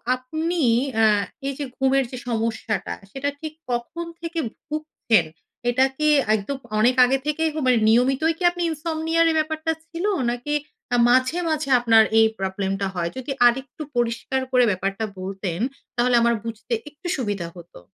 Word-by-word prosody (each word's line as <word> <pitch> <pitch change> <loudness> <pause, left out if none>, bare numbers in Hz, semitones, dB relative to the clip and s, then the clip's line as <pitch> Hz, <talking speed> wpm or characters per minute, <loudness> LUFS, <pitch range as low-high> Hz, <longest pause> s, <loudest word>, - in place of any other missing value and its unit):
আপনি 315 +7 -2 0.3
অ্যা 225 - +4 0.4
এইযে 275 +1 -3
ঘুমের 270 0 +3
যে 255 - -6
সমস্যাটা 225 -3 -2 0.2
সেটা 275 +3 -2
ঠিক 315 -1 -6 0.2
কখন 240 +8 -3 0.2
থেকে 335 0 -3 0.3
ভুগছেন? 300 - +1 0.4
এটা 255 +2 +4
কি 305 0 +1 0.3
একদম 220 +7 -3 0.2
অনেক 245 +3 +4
আগে 265 +2 +2
থেকেই 315 +2 +1
হ - - -12
মানে 250 - +5
নিয়মিতই 265 +7 +3
কি 360 - -6
আপনি 350 - -6
ইনসমনিয়া 320 +1 -1
র, - - +4
এই - - -1
ব্যাপারটা 315 +1 -1 0.2
ছিল? 345 +2 -4 0.3
নাকি 245 +5 -3 0.4
অ্যা 245 - +1
মাঝে, 255 +6 +3
মাঝে 305 -2 -1
আপনার 225 -2 +6 0.2
এই 225 - +6
প্রবলেমটা 195 0 -2
হয়? 170 -1 -1
যদি 260 +2 -5 0.2
আরেকটু 260 +4 -2
পরিষ্কার 240 +2 0
করে 250 -1 +5
ব্যাপারটা 195 +3 -2
বলতেন, 190 -2 -4 0.4
তাহলে 245 0 +3
আমার 235 0 +3
বুঝতে 230 +1 -5 0.2
একটু 305 +4 -10
সুবিধা 205 -8 -2
হতো। 175 0 -13
255 Hz, 155 wpm, -23 LUFS, 225-310 Hz, 0.4 s, আপনার